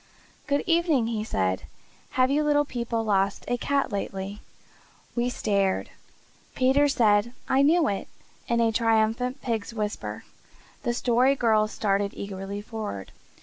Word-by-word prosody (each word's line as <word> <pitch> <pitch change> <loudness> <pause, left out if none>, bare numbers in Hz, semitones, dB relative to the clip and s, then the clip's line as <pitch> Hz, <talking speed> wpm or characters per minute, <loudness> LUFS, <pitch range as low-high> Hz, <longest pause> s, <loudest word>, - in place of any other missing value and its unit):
"Good 285 -1 +1
evening," 330 -7 +2
he 225 -2 -2
said. 95 - -1 0.5
"Have 255 +1 +4
you 295 +2 +3
little 290 -1 +3
people 235 -3 -2
lost 195 -2 +1
a 245 - +1
cat 275 +2 0
lately?" 195 0 -4 0.7
We 240 0 +1
stared. 200 -5 0 0.6
Peter 270 +3 +4
said 230 -4 +3
"I 265 - +3
knew 315 +2 +4
it!" 200 - -2 0.4
in 235 0 +2
a 225 -1 +3
triumphant 225 +4 +1
pig's 230 -2 -3
whisper. 210 -1 -4 0.6
The 240 - -1
Story 250 +3 +3
Girl 220 -4 +3
started 200 -2 -1
eagerly 200 0 -5
forward. 210 - -6
230 Hz, 135 wpm, -26 LUFS, 205-260 Hz, 0.7 s, Have